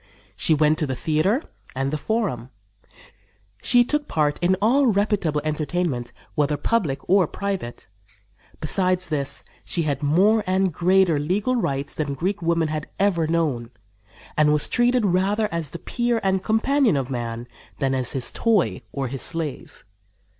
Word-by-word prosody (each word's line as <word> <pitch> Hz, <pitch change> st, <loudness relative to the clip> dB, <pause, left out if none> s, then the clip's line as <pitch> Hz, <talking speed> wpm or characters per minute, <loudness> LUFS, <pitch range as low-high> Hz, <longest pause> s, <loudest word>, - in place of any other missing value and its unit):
She 160 Hz, -, +3 dB
went 150 Hz, +1 st, +3 dB
to 155 Hz, -, 0 dB
the 130 Hz, -, -2 dB
theater 165 Hz, -, +1 dB, 0.3 s
and 135 Hz, +1 st, -1 dB
the -, -, -1 dB
Forum; 190 Hz, -, -2 dB, 1.1 s
she 245 Hz, -1 st, +5 dB
took 295 Hz, +2 st, -1 dB
part 150 Hz, -2 st, 0 dB
in 180 Hz, +2 st, +3 dB
all 255 Hz, +7 st, +3 dB
reputable 200 Hz, -8 st, +1 dB
entertainment, 155 Hz, -4 st, -2 dB, 0.2 s
whether 150 Hz, 0 st, +1 dB
public 150 Hz, -7 st, -1 dB
or 190 Hz, -2 st, +4 dB
private. 195 Hz, -12 st, -5 dB, 0.7 s
Besides 180 Hz, +3 st, 0 dB
this, 140 Hz, -3 st, -2 dB, 0.2 s
she 170 Hz, -, -1 dB
had 145 Hz, -2 st, -1 dB
more 195 Hz, +9 st, +3 dB
and 185 Hz, -1 st, +1 dB
greater 180 Hz, -2 st, +3 dB
legal 200 Hz, +11 st, 0 dB
rights 140 Hz, -, -1 dB
than 145 Hz, -3 st, -2 dB
Greek 190 Hz, +8 st, -2 dB
women 165 Hz, -1 st, +1 dB
had 155 Hz, 0 st, -4 dB
ever 180 Hz, -5 st, +2 dB
known, 150 Hz, -8 st, 0 dB, 0.7 s
and 155 Hz, -1 st, +4 dB
was 150 Hz, 0 st, +2 dB
treated 240 Hz, -1 st, +2 dB
rather 200 Hz, +4 st, +1 dB
as 165 Hz, -3 st, -3 dB
the 170 Hz, -, -7 dB
peer 240 Hz, +4 st, -1 dB
and 190 Hz, -1 st, +1 dB
companion 230 Hz, -, +2 dB
of 135 Hz, -1 st, -3 dB
man 120 Hz, -1 st, -4 dB, 0.3 s
than 135 Hz, -1 st, 0 dB
as 130 Hz, -2 st, -1 dB
his 130 Hz, -3 st, -1 dB
toy 225 Hz, -6 st, +1 dB
or 135 Hz, -2 st, -3 dB
his 135 Hz, +1 st, -5 dB
slave. 165 Hz, -4 st, -5 dB
165 Hz, 155 wpm, -23 LUFS, 145-200 Hz, 1.1 s, she